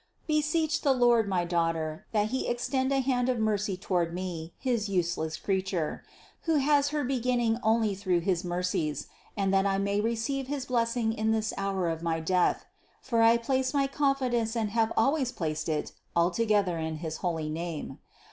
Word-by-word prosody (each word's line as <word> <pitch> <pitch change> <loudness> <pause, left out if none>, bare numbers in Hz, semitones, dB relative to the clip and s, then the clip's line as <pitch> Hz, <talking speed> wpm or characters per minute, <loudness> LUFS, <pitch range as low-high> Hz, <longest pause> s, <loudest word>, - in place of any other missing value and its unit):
Beseech 310 +1 +1
the 280 -3 +3
Lord, 240 -3 +4
my 180 -2 +1
Daughter, 165 0 -1
that 210 -1 +1
He 260 +2 -2
extend 260 +2 0
a 270 -1 +2
hand 255 -1 +1
of 250 - +1
mercy 210 -3 0
toward 175 -3 -1
me, 175 -3 -5
his 235 -5 -1
useless 170 -4 -1
crea 190 +1 0
ture, 180 -5 -3 0.4
who 325 -1 +2
has 285 0 +3
her 295 0 -1
beginning 245 -3 +1
only 220 -2 +2
through 185 -3 0
his 180 0 0
mercies, 175 -4 -1 0.3
and 195 -1 +1
that 195 +1 +3
I 195 0 +1
may 200 +1 0
receive 235 +4 -1
his 280 -1 -3
blessing 230 -2 0
in 220 0 -1
this 220 -1 0
hour 195 -2 -1
of 165 -1 -2
my 165 -1 -1
death; 180 +2 +1 0.3
for 235 -3 0
I 230 +1 +6
place 260 +3 -1
my 280 -1 +3
confidence 260 -5 0
and 220 -3 -1
have 225 0 +1
always 270 +2 +2
placed 155 -7 -3
it 155 -1 -1 0.2
altogether 185 +1 +2
in 160 0 -3
his 160 0 -5
holy 160 -4 -2
name. 160 -4 -5
215 Hz, 175 wpm, -28 LUFS, 175-250 Hz, 0.4 s, I